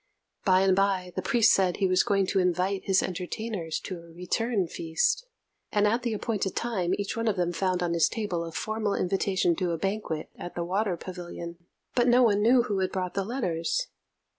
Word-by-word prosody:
By 185 -2 +5
and 190 -1 +4
by 190 -2 +1
the - - -1
priest 235 -3 +4
said 185 -2 +2
he 195 - +1
was 185 0 +4
going 195 -1 +2
to 195 +1 +1
invite 180 +2 0
his 190 -1 +3
entertainers 180 -1 -3
to 185 -3 -6
a 170 0 -14
return 195 +4 -1
feast; 165 - 0 0.4
and 205 -1 +3
at 230 +4 +1
the 235 -2 -1
appointed 205 -3 -2
time 190 -7 0
each 200 -1 -3
one 230 0 -1
of 215 - +2
them 175 -2 0
found 185 0 0
on 170 -1 0
his 170 -1 +3
table 205 -7 -2
a 165 - -6
formal 215 +3 -2
invitation 185 -2 +1
to 180 -3 0
a - - -1
banquet 195 -4 -3
at 175 - -8
the 175 - -2
Water 190 0 0
Pavilion, 170 -1 -7 0.3
but 245 0 +3
no 250 +1 +6
one 205 -3 +3
knew 240 +3 +5
who 205 -4 -1
had 185 -1 0
brought 185 -1 -3
the 195 - -1
letters. 210 - -1
190 Hz, 205 wpm, -27 LUFS, 175-215 Hz, 0.4 s, no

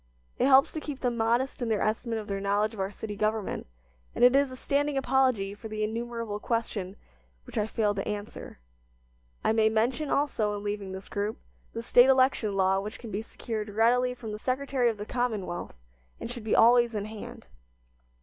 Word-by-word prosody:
It - - +4
helps 270 0 +6
to 315 - -4
keep 295 -3 -6
them 245 -2 0
modest 235 +4 0
in 240 - -1
their 215 -2 +1
estimate 225 +2 -1
of 215 - -5
their 200 -1 -3
knowledge 205 +2 +1
of 215 - -10
our 190 0 -1
city 210 0 -7
government, 215 - -1 0.5
and - - +1
it 250 +2 +7
is 280 0 +4
a 255 - -8
standing 285 +2 0
apology 255 -7 +2
for 215 +2 -9
the 215 0 -3
innumerable 230 -1 -3
question 210 -5 -2 0.5
which - - -13
I 210 - +1
fail 215 -2 +1
to - - -4
answer. 205 0 -6 0.9
I - - +3
may 220 -1 +4
mention, 240 +7 0
also, 220 -9 0
in 205 - -7
leaving 205 -2 -3
this 190 +1 -8
group, 205 +1 -3 0.4
the 230 - -5
State 245 +2 +6
election 255 -6 +3
law 190 0 +3
which 210 +2 -6
can 230 -3 -9
be 200 +2 -2
secured 220 -1 -5
readily 245 +4 +2
from 230 -3 -7
the 210 - -5
Secretary 260 0 0
of 225 - -3
the 205 - -6
Commonwealth, 215 - -3 0.4
and - - -5
should 240 -2 -7
be 215 - +1
always 235 0 +5
in 205 -1 -2
hand. 225 +2 -9
225 Hz, 200 wpm, -28 LUFS, 210-250 Hz, 0.9 s, it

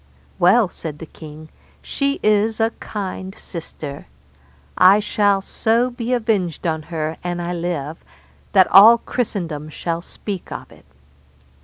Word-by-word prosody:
Well, 195 +5 +5
said 160 -4 -8
the 165 - -8
king, 155 0 -12 0.3
she 280 0 -1
is 215 +1 +2
a 225 0 +2
kind 190 -2 -6
sister; 150 -4 -8 0.7
I 190 +3 +6
shall 205 -2 +1
so 230 +5 +1
be 240 0 -4
avenged 215 -9 0
on 160 -2 0
her 160 -1 -3
an 175 0 -3
I 175 0 -3
live, 165 -3 -4 0.5
that 190 -2 +7
all 215 +5 +9
Christendom 170 -12 -4
shall 165 +2 -3
speak 195 +1 -7
of - - -7
it. - - -18
185 Hz, 135 wpm, -20 LUFS, 165-215 Hz, 0.7 s, all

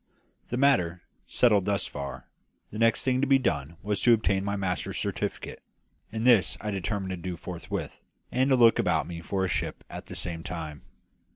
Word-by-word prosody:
The 120 - -2
matter 90 -11 +2 0.2
settled 105 -6 +3
thus 100 -1 +1
far, 70 -1 -7 0.4
the 110 - -6
next 115 0 +3
thing 130 -1 +1
to 140 - +2
be 135 0 +6
done 85 - -2
was 105 0 -1
to 120 -1 +6
obtain 100 -3 0
my 100 0 -1
master's 95 -3 -2
certificate; - - -3 0.5
and 110 +1 -3
this 115 -8 +5
I 105 - -3
determined 95 0 -2
to 90 - -3
do 90 0 -5
forthwith, 85 0 -6 0.3
and 130 +2 +2
to 135 - +5
look 115 -2 +6
about - - +2
me 85 -1 -7
for 95 +2 -1
a - - 0
ship - - -2
at - - -8
the - - -8
same 85 -2 -3
time. 80 -4 -6
100 Hz, 190 wpm, -27 LUFS, 90-115 Hz, 0.5 s, be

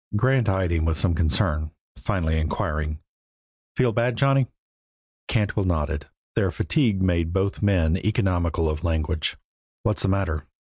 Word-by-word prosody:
Grant 125 +1 +3
eyed 95 -2 +1
him 80 -2 +1
with 80 -1 +1
some 90 -3 +3
concern, 80 -1 +1 0.3
finally 80 -5 -1
inquiring, 75 0 -2 0.8
"Feel 125 -2 +3
bad, 120 +2 +1
Johnny?" 135 -1 +3 0.8
Cantwell 105 -2 +1
nodded. 75 -3 -1 0.3
Their - - +2
fatigue 110 -11 +1
made 85 -3 +1
both 100 +1 0
men 90 -6 +3
economical 90 -5 0
of 75 0 -2
language. 80 -1 -1 0.5
"What's - - 0
the 100 - +1
matter?" 95 -6 -1
85 Hz, 135 wpm, -24 LUFS, 80-100 Hz, 0.8 s, Grant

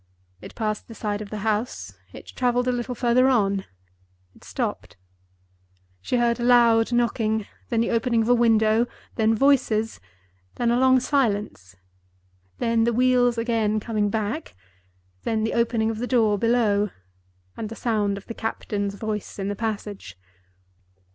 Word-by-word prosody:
It - - -11
passed 215 -1 -3
the 230 - -11
side 210 -1 -3
of 205 - -7
the 215 - -5
house; 220 +3 -2 0.2
it - - -11
traveled 245 0 +1
a - - +3
little 245 0 -3
further 250 +2 +3
on; 200 -6 +1 0.7
it - - -21
stopped. - - -4 1.0
She 245 - -1
heard 235 0 +1
a - - -2
loud 235 -1 +4
knocking—then 225 -1 -1
the 230 - 0
opening 230 -1 +1
of 225 - -2
a - - +6
window—then 225 -1 +1
voices—then 215 - -1
a 240 - +2
long 260 0 +5
silence—than 95 - -3
the 235 +1 +1
wheels 245 0 +3
again 225 -2 0
coming 210 -2 -1
back—then 95 - -5
the 225 - -1
opening 230 -1 +1
of 220 - -6
the 245 - -2
door 225 -5 +3
below, 215 -3 +2 0.7
and 215 - -5
the 225 - -7
sound 210 -4 0
of 200 - -10
the - - -7
captain's 205 -3 -3
voice 210 -1 -5
in 195 0 -3
the 205 - -3
passage. 205 - -5
220 Hz, 140 wpm, -24 LUFS, 200-240 Hz, 1.0 s, a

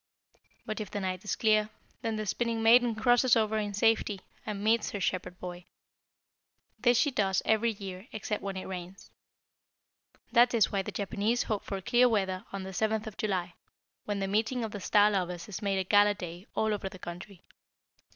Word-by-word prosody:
"But 215 -2 -4
if 210 -3 -5
the 205 - -4
night 185 0 -3
is 210 - -2
clear, 215 -1 +3 0.3
then 225 -1 -2
the 215 0 -3
Spinning 230 +2 -1
maiden 235 0 +6
crosses 245 +3 +4
over 220 -1 +1
in 205 -1 -3
safety, 215 -2 +2 0.3
and 205 -1 -4
meets 225 0 +2
her 205 - -4
Shepherd 180 -1 -2
boy. 180 -1 -7 1.1
This 245 -1 +4
she 285 +4 +3
does 195 -6 +1
every 220 +1 +3
year 195 0 -8
except 215 -1 -3
when 195 -1 -4
it 185 - -5
rains. 185 0 -8 1.2
That 240 0 +5
is 220 - +3
why 195 - +1
the - - -6
Japanese 210 +4 0
hope 215 -3 -2
for 195 - -4
clear 245 +4 +4
weather 190 -2 -1
on 195 -1 -5
the 190 - -6
7th 220 +3 0
of 220 -2 -7
July, 185 -4 -2 0.5
when 205 -1 -2
the 195 - -1
'meeting 220 +5 0
of 220 - -4
the 205 - -6
star 205 +2 +4
lovers' 180 -3 -2
is 210 0 -6
made 200 -2 0
a 190 - +1
gala 205 +2 +4
day 175 +1 -8
all 220 -1 +1
over 195 -2 -3
the 185 - -11
country." 180 +1 -9
205 Hz, 190 wpm, -30 LUFS, 190-220 Hz, 1.2 s, maiden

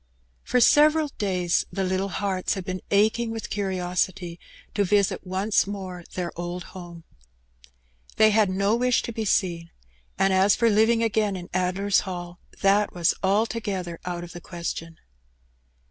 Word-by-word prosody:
For 250 - +1
several 300 +4 +5
days 180 -4 0
the 195 - -2
little 190 +1 -1
hearts 190 -1 -1
had 190 -2 -6
been 185 0 -4
aching 220 +3 +2
with 225 -1 -6
curiosity 180 -2 -2 0.3
to 205 - +1
visit 200 0 +1
once 195 +3 +1
more 185 -4 -6
their 180 -2 -3
old 175 +1 -5
home. 175 -2 -10 1.1
They 215 0 +5
had 210 -2 +3
no 200 +3 +1
wish 250 0 +2
to - - -4
be 225 -1 -4
seen, 170 -4 0 0.5
and 195 0 +3
as 190 +2 +4
for 230 -1 +3
living 225 +2 +3
again 215 -2 +1
in 175 -1 -8
Addler's 185 +2 +1
Hall, 175 -2 -6 0.2
that 200 +1 +3
was 170 -1 +2
altogether 200 -3 -1
out 175 -1 -4
of 175 - -9
the 175 - -9
question. 165 -1 -6
190 Hz, 150 wpm, -25 LUFS, 180-210 Hz, 1.1 s, several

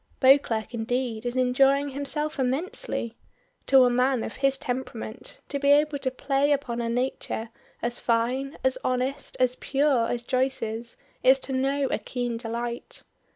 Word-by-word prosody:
Beauclerk 250 -5 +4
indeed 235 0 -2
is 240 - -2
enjoying 270 +3 +3
himself 285 +2 -2
immensely. 265 - -2 0.5
To 265 -1 +7
a 245 - +3
man 250 0 +2
of - - -6
his 275 0 +2
temperament 250 - -5
to 280 - -2
be 280 0 +2
able 295 0 +4
to 265 - -1
play 275 +2 0
upon 265 -5 0
a 230 - -2
nature 235 -2 -2 0.3
as 240 0 -1
fine, 250 +4 0
as 260 0 +2
honest, 255 +2 -2
as 255 -1 +3
pure 275 -4 +2
as 240 0 -2
Joyce's 240 -3 -2 0.2
is 260 +1 +6
to 265 - -2
know 275 +2 +1
a - - 0
keen 245 -2 -3
delight. 235 +1 -5
255 Hz, 155 wpm, -26 LUFS, 240-275 Hz, 0.5 s, To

